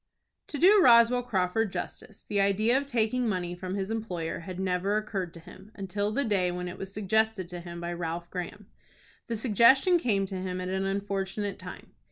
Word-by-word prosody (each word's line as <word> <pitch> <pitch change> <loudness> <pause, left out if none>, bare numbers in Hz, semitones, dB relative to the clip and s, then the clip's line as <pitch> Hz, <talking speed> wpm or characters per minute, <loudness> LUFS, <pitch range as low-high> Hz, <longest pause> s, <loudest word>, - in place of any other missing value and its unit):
To 295 - -5
do 390 +6 +6
Roswell 240 -3 +6
Crawford 205 -2 0
justice, 185 +3 -7
the 200 -1 0
idea 210 +5 +2
of 280 +1 0
taking 240 -1 0
money 180 -3 -2
from 185 +1 -5
his 195 +1 -3
employer 180 -8 -3
had 180 +1 -7
never 190 +2 0
occurred 195 -5 -3
to - - -9
him 185 +4 -14
until 205 +1 -2
the 280 +6 0
day 195 -5 +1
when 180 0 -4
it 180 - -7
was 195 0 -6
suggested 215 -1 0
to 175 -1 -6
him 170 0 -8
by 170 0 -4
Ralph 170 0 -4
Graham. 180 +3 -6 0.6
The 230 -2 -2
suggestion 260 - +5
came 205 -9 +1
to 190 -1 -5
him 185 -1 -3
at 180 0 -4
an 190 +1 -1
unfortunate 200 0 -3
time. - - -10
195 Hz, 195 wpm, -28 LUFS, 180-220 Hz, 0.6 s, do